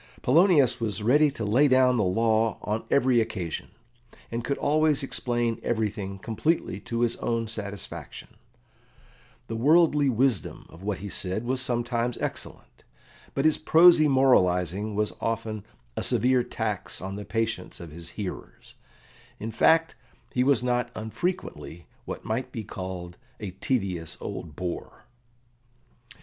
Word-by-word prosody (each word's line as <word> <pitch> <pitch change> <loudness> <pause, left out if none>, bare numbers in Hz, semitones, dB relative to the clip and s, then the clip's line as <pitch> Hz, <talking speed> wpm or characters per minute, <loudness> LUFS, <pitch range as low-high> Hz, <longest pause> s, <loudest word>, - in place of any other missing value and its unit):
Polonius 150 -3 +4
was 105 -3 -2
ready 145 +7 +5
to 115 -6 -5
lay 125 +8 +4
down 130 -1 +4
the 110 - +2
law 110 +3 +2
on 105 +2 -2
every 130 -3 +4
occasion, 90 -7 -4 0.6
and 115 0 -3
could 140 - -1
always 150 -1 +2
explain 120 -3 -1
everything 105 -4 -2
completely 115 - -1
to 115 +3 -3
his 120 -1 +1
own 115 -1 -1
satisfaction; 100 -3 -6 1.2
the 115 - -5
worldly 150 +2 +4
wisdom 130 +1 0
of 80 - -14
what 100 -1 -2
he 100 - -7
said 95 +2 -2
was 130 +2 -1
sometimes 120 -1 -1
excellent, - - -6 0.5
but 135 - 0
his 155 - +4
prosy 160 0 +6
moralising 100 - +3
was 105 -3 0
often 110 -2 -2 0.3
a - - -2
severe 125 0 +3
tax 110 -4 -3
on 95 +1 -5
the 105 - -6
patience 115 -3 -3
of 85 -3 -9
his 85 +1 -9
hearers; 100 -4 -7 0.7
in 110 +2 -4
fact, 160 +8 +4 0.4
he 125 - +2
was 130 -3 +3
not 125 -1 0
unfrequently 110 - -4 0.2
what - - -6
might 115 +4 -2
be 115 - -5
called 95 -3 -7 0.2
"a 105 -3 -5
tedious 95 -5 -2
old 75 -3 -6
bore." 90 -1 -6
115 Hz, 135 wpm, -26 LUFS, 100-130 Hz, 1.2 s, prosy